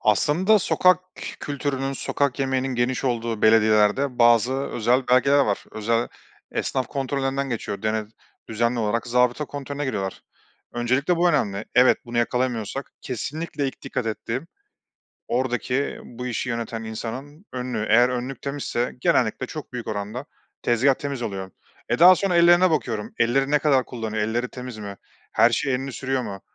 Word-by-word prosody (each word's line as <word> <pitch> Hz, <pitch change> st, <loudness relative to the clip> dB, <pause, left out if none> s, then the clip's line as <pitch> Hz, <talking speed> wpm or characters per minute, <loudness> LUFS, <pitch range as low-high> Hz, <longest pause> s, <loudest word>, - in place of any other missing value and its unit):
Aslında 160 Hz, -, +3 dB
sokak 185 Hz, -1 st, +4 dB, 0.4 s
kültürünün, 135 Hz, -1 st, -2 dB
sokak 140 Hz, 0 st, -1 dB
yemeğinin 130 Hz, -1 st, 0 dB
geniş 120 Hz, +2 st, 0 dB
olduğu 115 Hz, -3 st, -1 dB
belediyelerde 110 Hz, +4 st, +4 dB
bazı 120 Hz, +1 st, +5 dB
özel 125 Hz, -1 st, 0 dB
belgeler 140 Hz, +3 st, +4 dB
var. 105 Hz, -8 st, +1 dB
Özel 115 Hz, +2 st, 0 dB, 0.4 s
esnaf 130 Hz, -1 st, -1 dB
kontrollerinden 135 Hz, 0 st, -2 dB
geçiyor. 105 Hz, -4 st, -4 dB
Dene 110 Hz, 0 st, 0 dB, 0.4 s
düzenli 115 Hz, +2 st, 0 dB
olarak 115 Hz, +1 st, 0 dB
zabıta 125 Hz, +4 st, +2 dB
kontrolüne 145 Hz, 0 st, -5 dB
giriyorlar. 100 Hz, -8 st, -3 dB, 0.5 s
Öncelikle 130 Hz, +8 st, +1 dB
bu 175 Hz, +1 st, +3 dB
önemli. 105 Hz, -8 st, 0 dB
Evet, 125 Hz, +1 st, +6 dB
bunu 120 Hz, 0 st, -3 dB
yakalayamıyorsak 125 Hz, +1 st, -1 dB
kesinlikle 145 Hz, +4 st, -4 dB
ilk -, -, -11 dB
dikkat 125 Hz, -3 st, -3 dB
ettiğim, 115 Hz, +6 st, -3 dB, 0.8 s
oradaki 125 Hz, +2 st, -1 dB
bu 125 Hz, +1 st, -7 dB
işi 125 Hz, +1 st, -2 dB
yöneten 115 Hz, -1 st, -3 dB
insanın 130 Hz, -, -7 dB
önlüğü. 125 Hz, -4 st, -3 dB
Eğer 120 Hz, +2 st, +6 dB
önlük 125 Hz, +2 st, -4 dB
temizse 140 Hz, -3 st, -2 dB
genellikle 120 Hz, 0 st, +2 dB
çok 150 Hz, -1 st, -8 dB
büyük 120 Hz, -2 st, -5 dB
oranda 105 Hz, +5 st, -4 dB, 0.4 s
tezgâh 125 Hz, +4 st, +3 dB
temiz 140 Hz, -2 st, -5 dB
oluyor. 95 Hz, -4 st, -4 dB, 0.4 s
Eee, -, -, 0 dB
daha 180 Hz, +2 st, +9 dB
sonra 185 Hz, 0 st, 0 dB
ellerine 175 Hz, +1 st, +6 dB
bakıyorum, 115 Hz, -9 st, -2 dB
ellerini 135 Hz, +4 st, +2 dB
ne 150 Hz, -, +4 dB
kadar 135 Hz, -3 st, +3 dB
kullanıyor, 110 Hz, -3 st, -3 dB
elleri 120 Hz, +3 st, -1 dB
temiz 125 Hz, -2 st, -8 dB
mi, 100 Hz, -2 st, -7 dB, 0.3 s
her 115 Hz, +2 st, +5 dB
şeye 130 Hz, +2 st, +1 dB
elini 135 Hz, +1 st, -4 dB
sürüyor 135 Hz, +1 st, -1 dB
mu? 95 Hz, -1 st, -6 dB
125 Hz, 145 wpm, -24 LUFS, 115-140 Hz, 0.8 s, daha